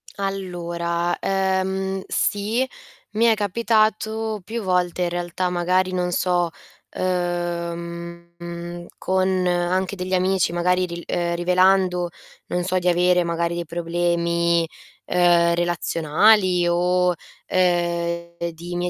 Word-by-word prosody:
Allora, 175 Hz, -3 st, -2 dB
ehm, 190 Hz, 0 st, -1 dB
sì, 220 Hz, +6 st, 0 dB, 0.4 s
mi 220 Hz, +2 st, +2 dB
è 230 Hz, -, +6 dB
capitato 220 Hz, 0 st, 0 dB
più 230 Hz, +5 st, -4 dB
volte 180 Hz, -2 st, 0 dB
in 175 Hz, -, 0 dB
realtà, 175 Hz, +1 st, -2 dB
magari 180 Hz, +1 st, +1 dB
non 180 Hz, -1 st, -1 dB
so, 175 Hz, -1 st, +1 dB, 0.5 s
uhm, 170 Hz, -1 st, -4 dB
con 185 Hz, -1 st, +1 dB
anche 180 Hz, +2 st, 0 dB
degli 185 Hz, 0 st, -4 dB
amici, 185 Hz, -1 st, +2 dB
magari 180 Hz, +1 st, +1 dB
ri 170 Hz, -1 st, -6 dB
ehm, 170 Hz, 0 st, -1 dB
rivelando, 180 Hz, 0 st, +3 dB, 0.4 s
non 180 Hz, 0 st, -1 dB
so, 185 Hz, 0 st, 0 dB
di 180 Hz, 0 st, +1 dB
avere 180 Hz, 0 st, +3 dB
magari 170 Hz, 0 st, -1 dB
dei 170 Hz, 0 st, -3 dB
problemi, 170 Hz, 0 st, 0 dB, 0.4 s
ehm, 175 Hz, -1 st, +4 dB
relazionali 175 Hz, +2 st, +3 dB
o, 180 Hz, +1 st, +2 dB, 0.3 s
ehm, 170 Hz, -1 st, 0 dB, 0.2 s
di 170 Hz, +2 st, -8 dB
mie 175 Hz, 0 st, -1 dB
180 Hz, 110 wpm, -22 LUFS, 170-185 Hz, 0.5 s, è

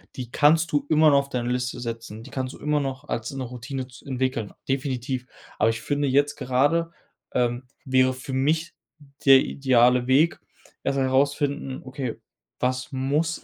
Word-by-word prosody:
die 125 Hz, -2 st, -6 dB
kannst 160 Hz, +3 st, +4 dB
du 145 Hz, -1 st, +1 dB
immer 155 Hz, 0 st, +6 dB
noch 140 Hz, -1 st, +5 dB
auf 140 Hz, 0 st, -4 dB
deine 125 Hz, -2 st, -2 dB
Liste 125 Hz, 0 st, -2 dB
setzen, 115 Hz, -2 st, -6 dB
die -, -, -11 dB
kannst 130 Hz, 0 st, -4 dB
du -, -, -13 dB
immer 150 Hz, 0 st, +1 dB
noch 135 Hz, -2 st, -4 dB
als 115 Hz, +5 st, -3 dB
'ne 135 Hz, -1 st, -4 dB
Routine 125 Hz, +2 st, -6 dB
z 125 Hz, -, -15 dB
entwickeln, 130 Hz, -5 st, -2 dB, 0.2 s
definitiv. 130 Hz, -1 st, -2 dB, 0.3 s
Aber 110 Hz, -, +4 dB
ich 115 Hz, 0 st, -2 dB
finde 145 Hz, +4 st, 0 dB
jetzt 145 Hz, +2 st, +2 dB
gerade, 145 Hz, +7 st, +1 dB, 0.4 s
ähm, 120 Hz, 0 st, 0 dB, 0.2 s
wäre 130 Hz, -1 st, +3 dB
für 130 Hz, +1 st, -8 dB
mich 155 Hz, +5 st, +1 dB, 0.5 s
der 135 Hz, -1 st, +9 dB
ideale 125 Hz, -2 st, +3 dB
Weg, 145 Hz, +6 st, +3 dB, 0.4 s
erst 135 Hz, 0 st, 0 dB
mal 135 Hz, -, +2 dB
herausfinden: 140 Hz, 0 st, 0 dB
„Okay, 130 Hz, -2 st, -4 dB, 0.5 s
was 130 Hz, +2 st, -1 dB
muss 145 Hz, +6 st, -1 dB
130 Hz, 170 wpm, -25 LUFS, 125-145 Hz, 0.5 s, der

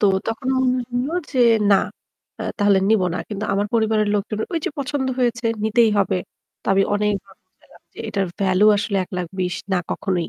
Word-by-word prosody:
তো 205 Hz, -, +4 dB, 0.2 s
তখন 225 Hz, +3 st, -3 dB
মনে 255 Hz, 0 st, +2 dB, 0.2 s
হলো 265 Hz, +6 st, -1 dB, 0.2 s
যে 260 Hz, -, -1 dB, 0.3 s
না, 195 Hz, -, +7 dB, 0.6 s
অ্যাঁ -, -, -3 dB
তাহলে 205 Hz, -2 st, +4 dB
নিব 220 Hz, -4 st, +4 dB
না। -, -, -2 dB
কিন্তু 210 Hz, 0 st, -4 dB
আমার 200 Hz, +1 st, +1 dB
পরিবারের 220 Hz, -2 st, +2 dB
লোকজন 210 Hz, +1 st, -2 dB
ঐ -, -, -2 dB
যে -, -, -1 dB
পছন্দ 270 Hz, -1 st, -2 dB
হয়েছে 235 Hz, -2 st, 0 dB, 0.2 s
নিতেই 225 Hz, +1 st, +4 dB
হবে। 195 Hz, -2 st, +1 dB, 0.4 s
তো -, -, -18 dB
আমি 195 Hz, 0 st, +4 dB
অনেকবার 205 Hz, -2 st, -1 dB
বোঝালাম 185 Hz, -, -24 dB
যে -, -, -16 dB
এটার 200 Hz, -2 st, -1 dB
ভ্যালু 190 Hz, +1 st, +3 dB
আসলে 200 Hz, 0 st, -1 dB
১,২০,০০০ 180 Hz, 0 st, -3 dB, 0.2 s
না 185 Hz, -, +3 dB
কখনোই। 180 Hz, -4 st, -1 dB
205 Hz, 180 wpm, -21 LUFS, 195-225 Hz, 0.6 s, না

